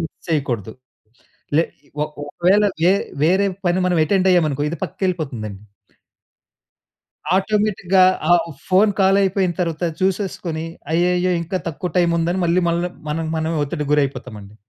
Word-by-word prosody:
Miss 160 - -4 0.2
చేయకూడదు. 125 - -1 0.8
లె 165 - +4 0.4
ఒక్ 150 0 -5
ఒకవేల 185 +7 +2 0.2
వె 180 - +6 0.3
వేరే 190 +4 +3 0.2
పని 175 +1 +2
మనం 175 -2 +1
అటెండ్ 190 +3 +2
అయ్యాము 175 -4 +4
అనుకో 145 +1 -3
ఇది 170 - -4
పక్కకి 190 +2 -5
ఎళ్ళిపోతుంది 140 -11 -3
అండి. 95 -1 -11 1.8
ఆటోమేటిక్‌గా 195 -2 +2 0.3
ఆ - - +8 0.3
ఫోన్ 195 +3 +4
కాల్ 195 +1 +4
అయిపోయిన 190 -2 +1
తరువాత 165 -1 -1 0.2
చూసేసుకొని. 185 -4 -2 0.3
అయ్యయ్యో! 180 +2 +2
ఇంకా 185 +3 -3
తక్కువ 175 +3 -4
టైమ్ 170 -1 +3
ఉందని, 175 +3 0
మళ్ళి 175 +2 +2
మళ్ళ 170 +1 0 0.3
మనకి 160 +1 -2
మనమే 160 0 -1
ఒత్తిడికి 150 0 -4
గురైపోతాం 135 -5 -1
అండి. 100 +1 -14
175 Hz, 145 wpm, -20 LUFS, 155-185 Hz, 1.8 s, ఆ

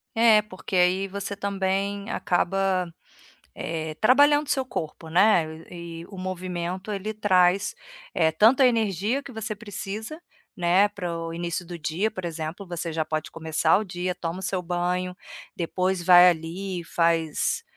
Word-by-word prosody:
É 225 -2 +6
porque 195 -2 -7
aí 185 +2 +3
você 200 +1 -5
também 200 +1 -2
acaba, 185 -1 0 0.6
eh, 160 -1 -4
trabalhando 290 +5 +5
seu 265 -2 +1
corpo, 160 -8 -6
né, 185 0 +5 0.3
e 170 -1 -8
o 195 - -11
movimento 185 +1 -4
ele 205 +2 -3
traz, 195 - +2 0.4
eh, 160 -2 +3
tanto 225 - +5
a - - +8
energia 225 +1 +1
que 275 - -10
você 220 -1 -4
precisa, 215 - -7 0.4
né, 180 +3 +4
para 180 -4 -5
o 165 0 -5
início 170 +1 -3
do 175 0 -7
dia 165 +7 -1
por 185 -4 -7
exemplo 165 +3 -5
você 170 -1 -4
já 160 0 -1
pode 155 0 -3
começar 160 +1 +1
o 215 - -3
dia, 180 -1 -3
toma 175 +1 -4
o - - -10
seu 185 0 -1
banho, 180 +1 -2 0.4
depois 180 +1 -1
vai 180 0 +8
ali 175 +3 -2
e - - -10
faz, 165 -2 0
185 Hz, 155 wpm, -25 LUFS, 170-200 Hz, 0.6 s, a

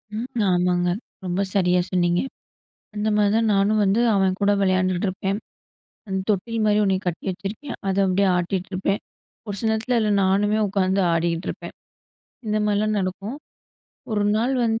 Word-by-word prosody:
ம், 240 +4 -4 0.2
ஆமாங்க 180 0 +2 0.4
ரொம்ப 180 +2 -1
சரியா 180 -2 +3
சொன்னீங்க, 175 -1 +2 0.7
அந்த 210 +1 -1
மாரிதான் 210 +2 +2
நானும் 205 +2 +2
வந்து, 200 +4 +2
அவன் 190 -1 +2
கூட 205 0 +4
விளையாண்டுட்டு 185 0 +1
இருப்பேன். 195 +2 -2 0.7
அந்த 190 0 -2
தொட்டில் 220 +3 0
மாரி 210 0 +3
1 190 -1 +2
கட்டி 170 - -3
வச்சிருக்கேன். 200 +9 -6
அத 190 - -1
அப்டியே 190 +1 +2
ஆட்டிட்ருப்பேன். 185 +2 -1 0.5
ஒரு 205 - -3
சில 225 - 0
நேரத்துல 225 +3 0
அதுல 215 -1 +1
நானுமே 205 +3 +2
உட்காந்து 190 0 +1
ஆடிட்டிருப்பேன். 165 +1 -2 0.7
இந்த 215 0 0
மாரிலாம் 210 +1 +1
நடக்கும். 195 +7 -4 0.8
ஒரு 205 -1 +1
நாள் 245 +4 +1
வந்து 225 0 0
195 Hz, 140 wpm, -23 LUFS, 185-215 Hz, 0.8 s, கூட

